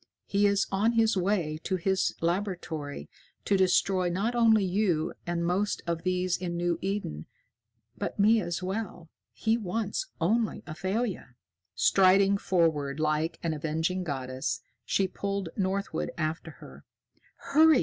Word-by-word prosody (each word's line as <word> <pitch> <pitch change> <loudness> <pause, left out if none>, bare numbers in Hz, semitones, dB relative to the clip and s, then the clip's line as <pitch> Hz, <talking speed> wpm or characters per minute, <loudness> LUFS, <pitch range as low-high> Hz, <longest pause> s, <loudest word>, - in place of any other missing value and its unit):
He 205 +1 +3
is 200 0 +2
on 210 +4 +2
his 225 -1 +3
way 180 -5 0
to 190 - -1
his 190 +1 0
laboratory 165 - -2 0.4
to 200 - +3
destroy 185 -1 +3
not 200 +7 -1
only 225 -4 +4
you 180 -4 +1
and 170 0 -1
most 190 +4 0
of 170 -1 -2
these 185 0 0
in 175 -1 -4
New 175 -1 0
Eden, 190 - -3 0.7
but - - -4
me 215 +2 +5
as 175 0 -3
well. 185 -4 -4 0.2
He 225 +1 0
wants 215 - -2
only 220 +6 +1
Athalia." 190 - -3 0.4
Striding 195 - +4
forward 155 -7 +1
like 155 +2 0
an 165 -2 0
avenging 160 +4 -1
goddess, 130 -5 -3 0.2
she 195 - +1
pulled 195 -1 -3
Northwood 195 0 -1
after 160 0 -2
her. 155 - -13 0.5
"Hurry!" 310 +1 +5
185 Hz, 135 wpm, -28 LUFS, 165-200 Hz, 0.7 s, me